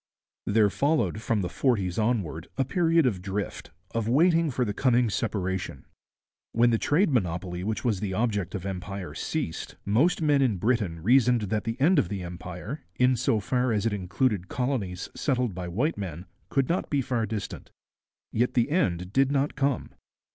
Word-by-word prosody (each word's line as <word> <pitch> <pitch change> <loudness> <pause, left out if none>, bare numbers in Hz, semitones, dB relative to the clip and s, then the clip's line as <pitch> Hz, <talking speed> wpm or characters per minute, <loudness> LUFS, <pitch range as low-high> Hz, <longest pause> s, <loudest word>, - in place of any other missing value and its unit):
There 105 -1 +4
followed, 145 -5 +1
from 115 -2 0
the 90 - -1
forties 95 -1 0
onward, 100 -8 -1
a 135 - +2
period 165 0 +3
of 100 -8 0
drift, 100 +2 -4 0.2
of 115 -1 -1
waiting 165 +4 +4
for 125 -1 0
the 105 - -2
coming 120 0 +2
separation. 95 - -2 0.7
When 120 +1 +4
the 115 - +2
trade 160 +4 +2
monopoly 90 -5 -1
which 110 +4 -3
was 110 -6 +1
the 95 -2 -3
object 105 -5 -1
of 95 -1 -5
empire 95 0 -5
ceased, 80 - -4
most 125 - +3
men 145 -3 +3
in 120 -7 +2
Britain 100 -6 0
reasoned 125 +1 +4
that 105 - -1
the 115 +1 -3
end 170 +7 +5
of 90 - 0
the 100 -3 -4
Empire, 90 - -7
in 125 0 +3
so 115 -2 +1
far 125 +5 0
as 105 -1 0
it 115 - +1
included 100 +1 0
colonies 110 -9 -2
settled 125 -6 0
by 90 0 -5
white 120 - -1
men, 90 -3 -5 0.2
could 135 -2 +1
not 175 - -1
be 140 -2 +1
far 115 -3 -1
distant. 110 -3 -5 0.6
Yet 125 +3 0
the 120 +3 +2
end 90 - 0
did 135 0 +3
not 140 +1 +1
come. 140 -3 0
115 Hz, 175 wpm, -27 LUFS, 95-130 Hz, 0.7 s, end